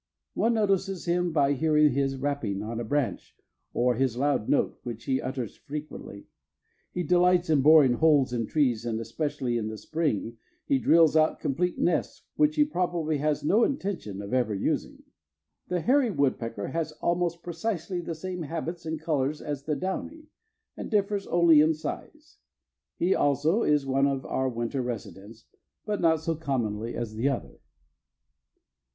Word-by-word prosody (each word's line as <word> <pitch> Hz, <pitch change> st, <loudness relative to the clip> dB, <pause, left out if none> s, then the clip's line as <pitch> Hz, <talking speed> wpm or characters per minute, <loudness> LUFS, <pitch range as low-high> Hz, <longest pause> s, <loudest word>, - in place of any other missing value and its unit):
One 230 Hz, +1 st, +1 dB
notices 195 Hz, -3 st, 0 dB
him 175 Hz, 0 st, +1 dB
by 145 Hz, -3 st, +3 dB
hearing 150 Hz, +1 st, +3 dB
his 135 Hz, 0 st, 0 dB
rapping 135 Hz, -8 st, -2 dB
on 115 Hz, +2 st, -4 dB
a -, -, -2 dB
branch 140 Hz, +3 st, -2 dB, 0.4 s
or 125 Hz, +1 st, +2 dB
his 125 Hz, -1 st, 0 dB
loud 140 Hz, -5 st, 0 dB
note, 145 Hz, -, +1 dB
which 115 Hz, -2 st, -7 dB
he 130 Hz, -1 st, 0 dB
utters 130 Hz, -4 st, -5 dB
frequently. 150 Hz, -8 st, -8 dB, 0.7 s
He 180 Hz, -, -2 dB
delights 180 Hz, 0 st, +3 dB
in 145 Hz, -3 st, +4 dB
boring 150 Hz, -3 st, +7 dB
holes 145 Hz, -2 st, +3 dB
in 115 Hz, -3 st, -1 dB
trees 125 Hz, -7 st, +1 dB
and, 115 Hz, -2 st, -2 dB
especially 120 Hz, +1 st, -2 dB
in 110 Hz, -, -3 dB
the 110 Hz, 0 st, -5 dB
spring, 120 Hz, -6 st, -2 dB, 0.3 s
he 135 Hz, -, +2 dB
drills 160 Hz, +2 st, +5 dB
out 155 Hz, 0 st, +3 dB
complete 175 Hz, +6 st, -1 dB
nests 175 Hz, -, -1 dB
which 300 Hz, 0 st, +3 dB
he 295 Hz, -, +4 dB
probably 175 Hz, -, -1 dB
has 150 Hz, 0 st, 0 dB
no 210 Hz, +10 st, +3 dB
intention 185 Hz, -, -3 dB
of 100 Hz, -, -7 dB
ever 120 Hz, -5 st, +1 dB
using. 95 Hz, -, -2 dB, 0.6 s
The 180 Hz, -1 st, -1 dB
hairy 260 Hz, -, +3 dB
woodpecker 115 Hz, -, -1 dB
has 160 Hz, +1 st, -3 dB
almost 170 Hz, +1 st, -1 dB
precisely 175 Hz, 0 st, -3 dB
the 165 Hz, -1 st, -5 dB
same 180 Hz, +2 st, -5 dB
habits 165 Hz, +2 st, -5 dB
and 160 Hz, 0 st, -3 dB
colors 150 Hz, -2 st, -1 dB
as 145 Hz, -2 st, -5 dB
the 150 Hz, -, 0 dB
downy, 270 Hz, -, -5 dB, 0.5 s
and -, -, -6 dB
differs 205 Hz, -2 st, 0 dB
only 170 Hz, -3 st, +5 dB
in 155 Hz, +1 st, +3 dB
size. 305 Hz, -, -8 dB, 0.6 s
He, 180 Hz, +3 st, +2 dB
also, 150 Hz, -, +2 dB
is 150 Hz, -6 st, +2 dB
one 135 Hz, +1 st, +2 dB
of 135 Hz, -1 st, -2 dB
our 130 Hz, 0 st, -1 dB
winter 120 Hz, +2 st, -2 dB
residents, 110 Hz, -2 st, -7 dB, 0.4 s
but 210 Hz, -1 st, -2 dB
not 160 Hz, -2 st, +3 dB
so 165 Hz, 0 st, -1 dB
commonly 120 Hz, -8 st, -2 dB
as 115 Hz, -2 st, -4 dB
the 115 Hz, +6 st, 0 dB
other. 135 Hz, -, -5 dB
150 Hz, 160 wpm, -27 LUFS, 125-175 Hz, 0.7 s, boring